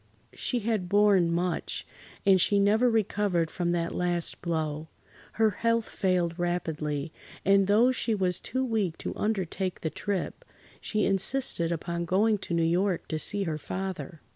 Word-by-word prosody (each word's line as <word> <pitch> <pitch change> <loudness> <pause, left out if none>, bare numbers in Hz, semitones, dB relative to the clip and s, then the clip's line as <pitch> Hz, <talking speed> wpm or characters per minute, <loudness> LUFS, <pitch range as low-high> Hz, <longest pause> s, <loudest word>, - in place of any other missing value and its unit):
She 245 -2 -1
had 210 -5 -1
borne 200 -4 +4
much, 175 0 -2 0.4
and 190 -2 +5
she 205 - +3
never 215 +5 +4
recovered 205 -6 +1
from 175 -2 -1
that 170 -1 -1
last 175 -1 -1
blow. 160 -2 -2 0.5
Her 220 -1 +3
health 230 +2 0
failed 180 -3 0
rapidly, 160 -4 -2 0.3
and 195 0 +4
though 225 +5 +5
she 235 -3 0
was 185 -3 0
too 260 +2 -2
weak 210 -9 -1
to - - -4
undertake 190 -3 -2
the 160 - -2
trip, 200 -3 -3 0.4
she 215 -1 0
insisted 195 -3 +1
upon 170 +1 -3
going 210 +5 +2
to 170 - -3
New 165 - +2
York 180 +3 +1
to 155 - -2
see 205 +5 +1
her 155 -4 -3
father. 180 -4 -5
185 Hz, 155 wpm, -28 LUFS, 170-210 Hz, 0.5 s, and